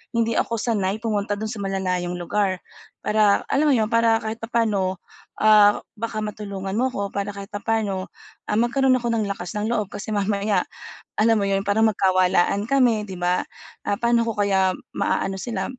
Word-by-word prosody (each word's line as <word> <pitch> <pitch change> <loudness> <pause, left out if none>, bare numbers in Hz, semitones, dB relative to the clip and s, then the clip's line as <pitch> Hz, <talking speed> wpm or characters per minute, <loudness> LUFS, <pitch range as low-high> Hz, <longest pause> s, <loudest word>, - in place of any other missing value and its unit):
hindi 230 0 +2
ako 230 - 0
sanay 205 -4 0
pumunta 205 -2 -1
do'n 220 - -3
sa 220 - -6
malalayong 185 -2 -2
lugar. 190 +1 0 0.4
Para 210 -1 +3
alam 295 +1 +2
mo - - +5
'yon 220 -2 +2
para 230 0 +3
kahit 220 0 -5
papaano, 210 -6 0 0.4
ah, 210 -1 +6 0.2
baka 225 0 -4
matulungan 200 -2 -5
mo 255 +2 +1
ako, 200 -4 -4
para 200 0 -2
kahit 200 -1 -8
na - - -2
papaano 220 -3 0 0.6
ah, 210 - +2
magkaroon 255 +2 +3
ako 240 - -3
ng 220 - +1
lakas 180 -1 -6
ng 210 +2 -1
loob 210 -4 0
kasi 205 +2 -7
mamaya, 200 -1 0 0.5
alam 225 0 +4
mo 200 - 0
yun 195 0 +1
parang 205 +3 +2
magkawalaan 190 -1 +2
kami, 240 -4 +2
'di 190 -3 -8
ba? 180 +1 0 0.4
Ah, - - 0
paano 235 0 +3
ko 225 -2 -3
kaya 190 -2 +2 0.2
ma-aano 195 0 -1
sila, 240 -2 -3
210 Hz, 180 wpm, -23 LUFS, 195-225 Hz, 0.6 s, ah